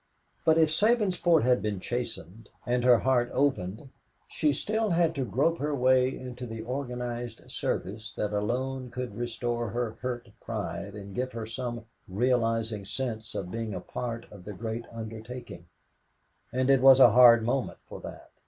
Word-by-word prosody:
But 160 0 +5
if 160 -1 +5
Sabinsport 180 - +3
had 125 0 +3
been 105 -3 -2
chastened 115 -2 -5 0.2
and 120 0 +1
her 125 -1 +7
heart 125 -1 +2
opened, 125 -3 0 0.4
she 150 -2 +1
still 215 +9 -1
had 170 -2 +2
to 135 - -2
grope 145 +7 +1
her 150 +1 -1
way 130 0 +4
into 125 -1 -7
the 115 -1 -6
organized 120 -2 -4
service 105 +4 -3
that 105 0 -1
alone 125 +5 -2
could 125 -2 -5
restore 120 0 -2
her 115 0 -3
hurt 120 -3 -4
pride 100 -2 -5
and 100 -1 -9
give 130 +4 -3
her 115 -1 -4
some 120 0 -5 0.2
realizing 115 0 0
sense 110 0 -4
of 90 -2 -4
being 115 -3 -3
a - - -3
part 115 +4 -5
of 100 -3 -12
the 105 - -7
great 115 +3 -5
undertaking; 115 -4 -8 0.8
and 130 +2 +2
it 135 -2 +4
was 135 0 +8
a 120 - +9
hard 120 -1 +8
moment 125 +3 -1
for - - -9
that. - - -10
120 Hz, 160 wpm, -28 LUFS, 110-130 Hz, 0.8 s, a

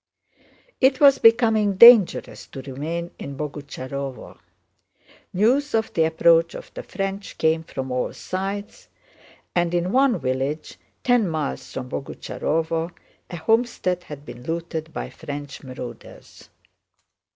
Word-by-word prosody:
It 265 0 +4
was 275 -2 +6
becoming 225 -3 +4
dangerous 230 -2 +6
to 135 - -9
remain 160 +6 -5
in 140 -1 -7
Boguchárovo. 140 -2 -6 0.9
News 245 +9 +2
of 220 0 0
the 160 - +3
approach 165 +1 +3
of - - -10
the - - -6
French 195 +1 -5
came 160 0 +2
from 130 -4 -6
all 125 0 -1
sides, 195 +3 -5 0.7
and 175 0 +1
in 175 +1 0
one 260 -2 +3
village, 135 +2 -3 0.2
ten 245 -6 +3
miles 155 -3 -4
from 125 - -5
Boguchárovo, 160 +4 -2 0.4
a 175 - -6
homestead 185 -3 0
had 145 -1 -10
been 120 -2 -10
looted 165 +2 -4
by - - -5
French 145 -3 -7
marauders. 130 -2 -10
165 Hz, 120 wpm, -23 LUFS, 145-205 Hz, 0.9 s, was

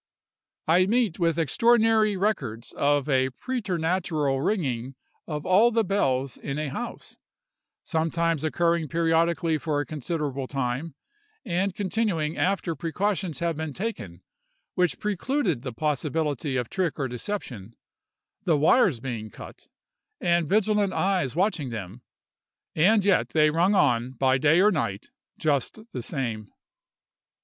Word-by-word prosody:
I 180 +4 +4
meet 225 -5 +1
with 165 -2 +2
numerous 165 - +1
extraordinary 220 - +3
records 135 - -2
of 145 0 +1
a 130 -2 +2
preternatural 170 - -1
ringing 135 - -1 0.3
of 150 -2 -4
all 205 +6 +5
the 230 -1 +1
bells 135 - 0
in 140 +1 -5
a 155 -1 -2
house; 240 - -7 0.7
sometimes 165 -1 0
occurring 170 0 +1
periodically 165 +1 +1
for 150 -1 -1
a 145 - -2
considerable 145 -2 -3
time, 135 +3 -3 0.5
and 185 +2 -1
continuing 190 -6 -1
after 185 -3 0
precautions 180 +1 -2
have 170 -1 0
been 160 -2 -4
taken 105 - -5 0.5
which 180 -2 +1
precluded 210 - -1
the 130 -1 -5
possibility 150 0 -1
of 125 -2 -1
trick 185 -1 -2
or 135 - -1
deception, 120 - -6 0.7
the 165 -4 +2
wires 155 - +4
being 115 -4 -5
cut, - - -12 0.5
and 170 -3 +1
vigilant 210 0 +2
eyes 185 -9 0
watching 180 -7 0
them; 110 0 -7 0.7
and 195 +6 +4
yet 200 -2 +3
they 155 -1 +3
rung 175 +6 +2
on, 125 -6 +2
by 130 +1 +2
day 155 +5 +4
or 210 +2 +5
night, 115 - -3 0.3
just 145 - 0
the 125 - -4
same. 115 - -4
160 Hz, 130 wpm, -26 LUFS, 135-190 Hz, 0.7 s, all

